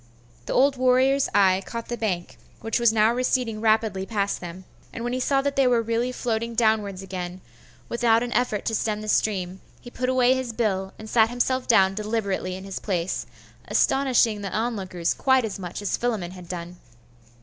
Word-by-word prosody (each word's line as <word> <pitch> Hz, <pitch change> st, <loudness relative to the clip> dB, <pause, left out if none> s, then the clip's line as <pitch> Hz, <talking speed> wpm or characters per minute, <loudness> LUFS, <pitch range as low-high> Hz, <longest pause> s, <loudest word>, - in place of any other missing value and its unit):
The -, -, -2 dB
old 270 Hz, +1 st, +3 dB
warrior's 260 Hz, +2 st, +3 dB
eye 190 Hz, -1 st, +4 dB
caught 230 Hz, +2 st, -6 dB
the 240 Hz, -, -3 dB
bank, 190 Hz, -7 st, -3 dB, 0.2 s
which 225 Hz, +2 st, -1 dB
was 235 Hz, -2 st, +4 dB
now 220 Hz, +1 st, +3 dB
receding 245 Hz, -3 st, 0 dB
rapidly 220 Hz, -3 st, +2 dB
past 200 Hz, -3 st, -1 dB
them; 175 Hz, +1 st, -8 dB, 0.3 s
and 230 Hz, -, -6 dB
when 240 Hz, +1 st, -2 dB
he 255 Hz, -, -1 dB
saw 270 Hz, +1 st, +1 dB
that 280 Hz, 0 st, -1 dB
they 270 Hz, -2 st, +4 dB
were 240 Hz, -2 st, +3 dB
really 230 Hz, +2 st, -1 dB
floating 230 Hz, -2 st, -2 dB
downwards 215 Hz, -4 st, +1 dB
again, 180 Hz, -1 st, -6 dB, 0.5 s
without 235 Hz, -1 st, +2 dB
an 245 Hz, -, -4 dB
effort 230 Hz, -4 st, 0 dB
to 225 Hz, -, -1 dB
stem 215 Hz, -1 st, -1 dB
the 215 Hz, -, -7 dB
stream, 190 Hz, -3 st, 0 dB, 0.2 s
he 240 Hz, -, -12 dB
put 255 Hz, +1 st, -2 dB
away 255 Hz, -1 st, +4 dB
his 260 Hz, -3 st, -3 dB
bill, 195 Hz, -4 st, -1 dB
and 215 Hz, -, -10 dB
sat 220 Hz, 0 st, +4 dB
himself 250 Hz, +1 st, -1 dB
down 195 Hz, -5 st, +5 dB
deliberately 205 Hz, -3 st, -2 dB
in 190 Hz, -, -8 dB
his 195 Hz, -1 st, -6 dB
place, 180 Hz, -3 st, -2 dB, 0.4 s
astonishing 245 Hz, -6 st, +2 dB
the 200 Hz, -, -4 dB
onlookers 195 Hz, -7 st, -1 dB
quite 260 Hz, -2 st, +2 dB
as 210 Hz, -2 st, -5 dB
much 180 Hz, +2 st, -6 dB
as 205 Hz, -, -1 dB
Philammon 215 Hz, -8 st, -2 dB
had 180 Hz, -2 st, -12 dB
done. 175 Hz, 0 st, -6 dB
220 Hz, 190 wpm, -24 LUFS, 190-245 Hz, 0.5 s, down